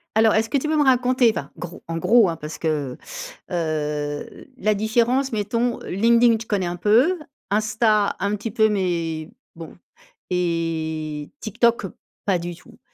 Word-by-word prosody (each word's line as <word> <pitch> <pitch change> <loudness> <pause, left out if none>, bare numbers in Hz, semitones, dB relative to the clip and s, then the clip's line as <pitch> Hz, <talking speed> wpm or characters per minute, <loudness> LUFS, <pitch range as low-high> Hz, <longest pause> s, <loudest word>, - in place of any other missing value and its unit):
Alors, 220 0 +5
est-ce 220 +1 +1
que 285 - +2
tu 280 - -2
peux 310 - +1
me 295 - +4
raconter, 255 -2 +4
enfin, 140 -9 -6
gros 175 -1 -8
en 165 0 -3
gros, 220 +4 +5
hein, 165 - -2
parce 150 0 -7
que, 150 -5 -2 0.5
heu 150 -3 -3
la 215 -4 +2
différence 235 +6 +1
mettons. 230 +3 -1
LinkedIn 230 +4 +4
je 225 - -8
connais 200 -3 0
un 175 0 -2
peu, 240 - +3 0.3
Insta 215 0 +2
un 200 +2 0
petit 210 +2 -5
peu 220 0 +3
mais, 170 -5 -1 0.3
bon 165 -1 -10 0.5
et 160 -4 -2
TikTok 230 -1 +1 0.4
pas 190 -3 +2
du 175 0 -5
tout. 175 - -18
205 Hz, 160 wpm, -23 LUFS, 165-230 Hz, 0.5 s, Alors